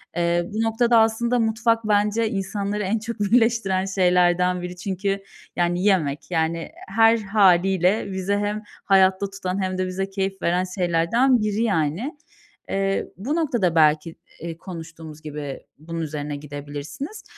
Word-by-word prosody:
eee, 170 0 +1
bu 220 - -1
noktada 230 +1 +3
aslında, 235 +2 +2
mutfak 225 0 +1
bence 210 +2 +2
insanları 200 +1 -2
en 210 +3 0
çok 230 +1 -6
birleştiren 205 -3 +2
şeylerden 180 -1 +2
biri 180 0 -6
çünkü, 195 +2 -3 0.3
yani, 175 +1 0
yemek, 175 -6 +1
yani, 165 0 -1 0.2
her 225 +3 +4
hâliyle 195 -1 +3
bizi 190 +1 -2
hem 205 +1 -1 0.2
hayatta 190 0 +4
tutan 195 0 -3
hem 185 0 -2
de 185 0 -1
bize 195 +1 -3
keyif 195 -1 -3
veren 180 +2 +1
şeylerden 185 +9 +2
biri 210 +1 0
yani. 200 - -1 0.5
Eee, 195 0 0
bu 265 - -2
noktada 240 - +1
belki, 155 +1 +3 0.3
eee, 165 -1 -6
konuştuğumuz 165 -3 -9
gibi 150 -3 -6 0.2
bunun 165 +2 -6
üzerine 150 -2 -4
gidebilirsiniz. 145 - -7
190 Hz, 140 wpm, -23 LUFS, 170-215 Hz, 0.5 s, her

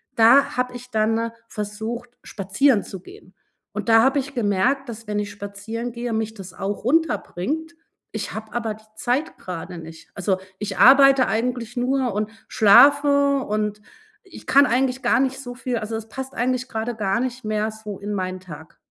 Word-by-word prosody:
Da 235 +5 +5
habe 250 0 -1
ich 250 +1 -14
dann, 220 +1 +1
äh, 230 0 -2 0.2
versucht, 220 +3 -5
spazieren 200 +5 +1
zu 190 - -9
gehen. 185 0 -15 0.4
Und 210 +1 -4
da 225 0 +7
habe 270 +2 +3
ich 275 +1 -5
gemerkt, 240 +5 +1
dass 225 -1 -8
wenn 210 0 -1
ich 205 0 -3
spazieren 205 +4 -6
gehe, 235 0 -4
mich 220 0 -2
das 195 -3 -10
auch 200 +2 -4
runterbringt. 320 - -1 0.4
Ich 215 -2 -4
habe 215 +1 -8
aber 230 -3 -2
die 215 - -19
Zeit 245 +7 -1
gerade 180 0 -7
nicht. 160 0 -11
Also, 195 -1 0 0.2
ich 205 -3 -4
arbeite 270 0 +7
eigentlich 240 +1 -2
nur 255 -1 0
und 210 +1 -2 0.2
schlafe 280 +5 +5
und 210 0 -2 0.4
ich - - -14
kann 280 +1 +6
eigentlich 255 0 +1
gar - - +3
nicht 265 0 0
so 245 -2 -7
viel 250 -1 -3
also, 220 +1 -4
es 220 0 -8
passt 265 +4 -7
eigentlich 255 +1 -1
gerade 225 +1 -3
gar 200 -1 0
nicht 255 0 -3
mehr 215 0 -1
so 215 -2 -8
in 205 +1 -4
meinen 185 -1 -3
Tag. 160 -4 -12
225 Hz, 180 wpm, -22 LUFS, 205-255 Hz, 0.4 s, da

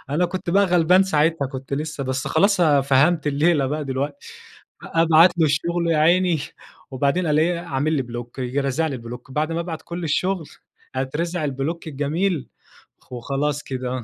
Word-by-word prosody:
أنا 160 +5 +1
كنت 175 0 -3
بقى 200 +3 +4
غلبان 180 +1 +4
ساعتها 160 -5 +1
كنت 130 +1 -8
لسه، 150 -1 -4
بس 130 +1 -3
خلاص 200 -1 +2
آآ، 145 -4 +4
فهمت 140 +5 +2
الليلة 145 0 +2
بقى 150 +2 -3
دلوقتي. 140 +2 -4 0.6
أبعت 165 +2 +4
له 160 - +4
الشغل 170 +4 0
يا 160 - +2
عيني 170 +1 +3 0.5
وبعدين 140 +7 0
ا - - 0
الاقيه 160 +3 +2
عامل 155 -2 -1
لي 140 -4 +1
بلوك 120 +1 -8
ييجي 130 +2 -1
رازع 140 +4 0
لي 140 -4 -3
بلوك 120 +2 -9
بعد 155 +3 -1
ما 170 - -1
أبعت 165 -2 -5
كل 170 0 -6
الشغل، 180 +3 0 0.5
أترزع 155 +6 -2
البلوك 150 +4 -3
الجميل 155 +3 -1 0.6
وخلاص 140 +4 -2
كده. 130 -2 -4
150 Hz, 165 wpm, -22 LUFS, 135-170 Hz, 0.6 s, بقى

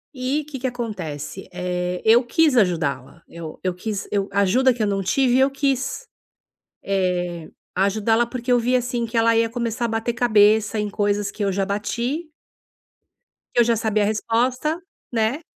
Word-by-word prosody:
E 265 +4 -1
que 280 -4 -7
que 260 - -1
acontece? 190 - -5
É, 180 0 -3
eu 235 +3 +6
quis 295 +3 +2
ajudá-la. 165 - 0
Eu 165 -2 -9
eu 185 -1 0
quis 205 +2 -4
eu 200 -1 0
a 200 - +2
ajuda 255 +7 +4
que 235 -3 -2
eu - - +2
não 195 -1 0
tive, 255 +5 +2
eu 270 +1 +4
quis, 275 - -1 0.8
eh, 180 -4 -1 0.3
ajudá-la 215 +4 +2
porque 250 0 -5
eu 245 - +5
vi 245 +2 +1
assim 245 -1 0
que 230 - -5
ela 230 0 +4
ia 230 0 +3
começar 235 0 -3
a - - +1
bater 225 +1 -1
cabeça 220 -2 +3
em 210 -1 -2
coisas 205 -1 0
que 210 - -4
eu 195 - +1
já 195 +1 0
bati 235 - -3 1.2
que - - +2
eu - - +6
já 235 0 +2
sabia 215 -1 +1
a - - +2
resposta, 250 +9 0 0.3
né. 235 +7 0
225 Hz, 175 wpm, -22 LUFS, 195-245 Hz, 1.2 s, eu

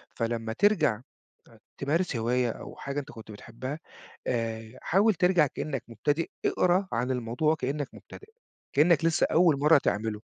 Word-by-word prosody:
فلمّا 115 -1 -2
ترجع 170 - +3
أ 110 - -17 0.8
تمارس 155 +1 0
هواية 120 +1 +1
أو - - -9
حاجة 140 +1 -4
أنت 145 +1 -10
كنت 110 -1 -11
بتحبها، 120 +7 -7 0.5
آآ 115 -1 -3
حاول 205 +5 +3
ترجع 180 -3 +3
كإنّك 135 -1 -4
مبتدئ، 145 +8 -1 0.2
اقرا 185 +2 +2
عن 125 +3 -1
الموضوع 125 +5 0
وكإنّك 145 -1 -2
مبتدئ، 415 - -13 0.4
كإنّك 160 +2 +4
لسّه 165 -1 +3
أول 165 -4 +4
مرّة 150 +1 +6
تعمله. 105 -3 -2
140 Hz, 145 wpm, -28 LUFS, 115-165 Hz, 0.8 s, مرّة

